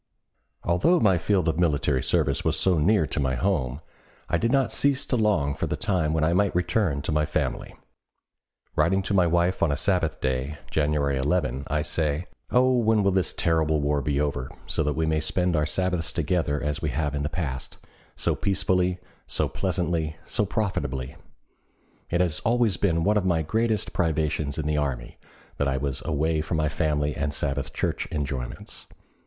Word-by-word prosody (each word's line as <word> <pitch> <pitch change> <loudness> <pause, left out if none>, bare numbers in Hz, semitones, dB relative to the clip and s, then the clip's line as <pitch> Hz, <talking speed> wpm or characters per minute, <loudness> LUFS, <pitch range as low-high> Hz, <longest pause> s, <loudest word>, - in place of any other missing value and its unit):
Although 90 - +3
my 95 -5 +3
field 95 0 +1
of 80 +1 0
military 75 -5 +2
service 75 -6 +1
was - - +1
so 90 -4 +3
near 95 +2 +3
to 75 - -3
my 65 -2 0
home, 65 -4 0 0.5
I - - +1
did 115 - +1
not 135 -1 +2
cease 140 0 +1
to - - 0
long 105 -11 +2
for - - -3
the - - -1
time 90 -6 +1
when 80 0 +1
I 80 +2 +2
might 100 +1 +2
return 90 -5 0
to - - -2
my 75 0 +2
family. 75 0 -2 1.0
Writing 90 +5 +2
to 100 - -2
my 90 -3 +4
wife 85 +2 +1
on 85 - +3
a 70 - 0
Sabbath 85 -2 0
day, 65 +3 -2
January 75 -2 +1
11, 70 -2 0
I 75 0 0
say: 75 +1 -1 0.2
"Oh, 130 +1 +4
when 110 -2 +3
will 100 - +3
this 95 -1 +1
terrible 80 -2 +1
war 70 0 +1
be 70 -1 0
over, 70 -4 -1 0.2
so - - -1
that 75 -1 0
we 80 - 0
may 80 0 +1
spend 90 +3 0
our 75 0 +1
Sabbaths 90 -1 0
together 85 -3 0
as 75 +2 -2
we 80 - -1
have 75 +2 -1
in 70 - -2
the 75 - -1
past, 75 -7 -4 0.4
so - - 0
peacefully, 90 -2 0 0.3
so - - +1
pleasantly, 85 -4 -1
so 105 - -1
profitably? 70 - -2 0.9
It 85 - +1
has 85 -4 +1
always 115 -3 +2
been 85 -4 +1
one 105 +3 +3
of 105 - +1
my 85 -3 +2
greatest 110 +4 0
privations 75 -4 0
in 80 - -2
the 75 0 0
army 65 -5 -3 0.4
that 70 - +1
I 65 -1 0
was 70 0 -2
away 80 +1 0
from 80 +1 -2
my 75 -1 +1
family 75 -1 0
and 70 0 -1
Sabbath 70 -3 -2
Church - - -2
enjoyments. 70 -5 -5
80 Hz, 185 wpm, -25 LUFS, 75-90 Hz, 1.0 s, my